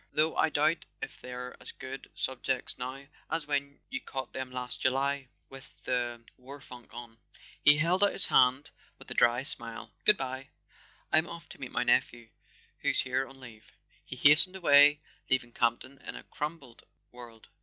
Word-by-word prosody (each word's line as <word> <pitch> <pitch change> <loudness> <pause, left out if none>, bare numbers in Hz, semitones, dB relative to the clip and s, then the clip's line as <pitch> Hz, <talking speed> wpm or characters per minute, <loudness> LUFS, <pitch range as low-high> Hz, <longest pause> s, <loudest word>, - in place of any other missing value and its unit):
Though 155 +1 +1
I - - +3
doubt 155 +2 +1 0.2
if - - -8
they're 125 0 -7
as - - -7
good 130 0 -9
sub¬ 130 -1 -3
jects 130 -2 -2
now 130 +2 -6 0.2
as 160 0 -2
when 140 -1 -2
you 275 +1 -4
caught 130 - -6
them 130 -1 -5
last 125 0 -6
July 135 0 0 0.2
with 135 0 -13
the 120 -2 -2
war 135 +3 -11
funk 125 -3 -13
on." 115 -1 -10 0.4
He 145 0 +7
held 175 +5 +2
out 205 - +4
his 195 - +6
hand 130 +3 +3 0.3
with - - -14
a - - -1
dry 120 +2 +3
smile. 120 -6 0
" - - -41
Good¬ 210 - +7
bye. 130 0 -5 0.6
I'm 160 +2 +4
off 170 -1 -9
to - - -12
meet - - -6
my - - 0
nephew, 120 -1 +1 0.5
who's - - +1
here 130 +1 -1
on 135 0 -15
leave." 115 -4 -14 0.3
He - - -8
hastened 160 +6 +6
away, 145 -4 +6 0.3
leaving 130 -2 0
Campton 120 +3 -1
in - - -8
a - - -9
crumbled 150 -6 -7 0.3
world. 120 -2 -13
135 Hz, 180 wpm, -30 LUFS, 125-150 Hz, 0.6 s, He